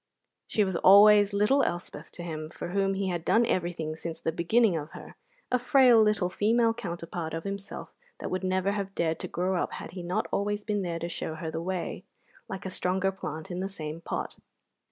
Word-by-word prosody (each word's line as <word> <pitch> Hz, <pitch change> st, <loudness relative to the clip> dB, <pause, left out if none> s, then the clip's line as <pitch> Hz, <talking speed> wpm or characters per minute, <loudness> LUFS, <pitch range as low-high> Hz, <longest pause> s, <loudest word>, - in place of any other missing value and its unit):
She 215 Hz, -, +2 dB
was 190 Hz, -2 st, -2 dB
always 205 Hz, +2 st, +7 dB
little 210 Hz, +8 st, +3 dB
Elspeth 175 Hz, -7 st, -3 dB
to 175 Hz, -, -6 dB
him, 155 Hz, -2 st, -5 dB
for 175 Hz, -, -7 dB
whom 195 Hz, +1 st, +1 dB
he 190 Hz, 0 st, -1 dB
had 175 Hz, -2 st, -2 dB
done 230 Hz, +6 st, +4 dB
everything 170 Hz, -5 st, -2 dB
since 165 Hz, 0 st, -6 dB
the 165 Hz, -, -1 dB
beginning 185 Hz, +5 st, +3 dB
of 155 Hz, 0 st, -5 dB
her, -, -, -11 dB, 0.4 s
a 250 Hz, -, +3 dB
frail 250 Hz, -2 st, +6 dB
little 210 Hz, -4 st, +2 dB
female 225 Hz, +5 st, +2 dB
counterpart 170 Hz, -6 st, -5 dB
of 165 Hz, -, -4 dB
himself 200 Hz, 0 st, -6 dB, 0.2 s
that -, -, -5 dB
would 185 Hz, +1 st, -2 dB
never 185 Hz, +1 st, +1 dB
have 200 Hz, -1 st, -4 dB
dared 165 Hz, -1 st, 0 dB
to -, -, -4 dB
grow 180 Hz, +1 st, -1 dB
up -, -, -3 dB
had -, -, -7 dB
he 180 Hz, +1 st, -7 dB
not 175 Hz, +1 st, -1 dB
always 205 Hz, +1 st, -1 dB
been 210 Hz, -2 st, -1 dB
there 170 Hz, -3 st, -2 dB
to 170 Hz, -, -4 dB
show 160 Hz, -2 st, -4 dB
her 160 Hz, 0 st, -5 dB
the 160 Hz, -, -3 dB
way, 180 Hz, 0 st, -3 dB, 0.5 s
like 190 Hz, -1 st, -6 dB
a 190 Hz, -, -3 dB
stronger 190 Hz, +1 st, 0 dB
plant 160 Hz, -2 st, -6 dB
in 175 Hz, -, -3 dB
the 190 Hz, +1 st, -2 dB
same 160 Hz, -4 st, -6 dB
pot. -, -, -4 dB
185 Hz, 210 wpm, -28 LUFS, 170-205 Hz, 0.5 s, always